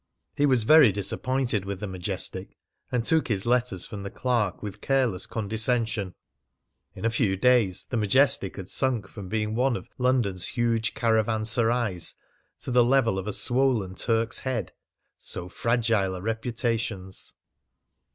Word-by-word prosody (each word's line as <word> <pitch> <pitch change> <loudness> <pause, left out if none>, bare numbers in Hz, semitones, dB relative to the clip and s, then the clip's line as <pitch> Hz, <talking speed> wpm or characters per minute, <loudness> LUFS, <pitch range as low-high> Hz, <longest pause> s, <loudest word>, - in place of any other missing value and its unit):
He 145 - +2
was 130 -5 +3
very 150 -1 +7
disappointed 120 +3 -1
with 100 -1 -5
the 105 - -4
Majestic, 95 -3 -4 0.3
and 120 -2 0
took 160 +3 +2
his 100 -4 -1
letters 120 -6 +1
from 105 -3 -7
the 100 - -5
clerk 115 -7 -1
with 105 0 -7
careless 130 -9 0
condescension. 110 -2 +1 0.8
In - - -6
a 115 - +2
few 110 -5 0
days 110 -4 +3
the 120 - -3
Majestic 115 -1 +2
had 95 - -7
sunk 125 -1 0
from 100 -4 -9
being 110 0 -1
one 125 +2 +1
of - - -7
"London's 120 -8 +1
huge 115 -3 -1
caravanserais" 110 -2 +1 0.5
to - - -4
the 125 0 +5
level 120 -5 +2
of 95 - -6
a - - -1
swollen 120 -2 +1
Turk's 115 +3 0
Head. 130 -4 -3 0.5
So 90 - -3
fragile 110 -2 0
are - - -8
reputations! 115 -4 -2
115 Hz, 145 wpm, -26 LUFS, 100-125 Hz, 0.8 s, very